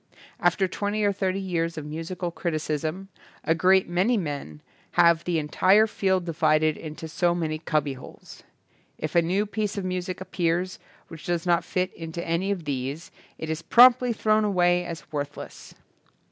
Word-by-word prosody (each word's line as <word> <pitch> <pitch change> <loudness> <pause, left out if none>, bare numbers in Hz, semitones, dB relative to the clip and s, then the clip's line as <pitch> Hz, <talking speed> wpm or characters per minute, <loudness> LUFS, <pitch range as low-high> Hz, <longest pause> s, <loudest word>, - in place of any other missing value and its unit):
After 190 0 +2
twenty 205 +3 -2
or 205 -1 +2
thirty 190 0 -1
years 170 -4 -2
of 155 - -5
musical 165 +3 -4
criticism 155 +2 -3 0.3
a 160 - +2
great 185 +3 +3
many 185 +8 +2
men 145 - -5 0.3
have 170 -1 +4
the 175 -2 0
entire 185 +7 +4
field 190 -4 0
divided 155 -2 +2
into 155 +1 -8
so 175 +2 +1
many 155 -2 -2
cubbyholes. 150 -4 -4 0.6
If 155 - -4
a 170 - +5
new 185 +5 0
piece 210 0 -3
of 195 - -3
music 185 0 -3
appears 180 0 -1 0.3
which 165 -1 -11
does 175 -1 -1
not 175 -1 +2
fit 185 -1 -2
into 165 +1 -6
any 170 +4 0
of 195 -4 -2
these 140 +3 -4 0.3
it 160 - -6
is 160 0 -3
promptly 245 +4 +6
thrown 215 -1 +2
away 180 -3 +2
as 165 -2 -7
worthless. 145 -2 -6
175 Hz, 160 wpm, -25 LUFS, 160-190 Hz, 0.6 s, promptly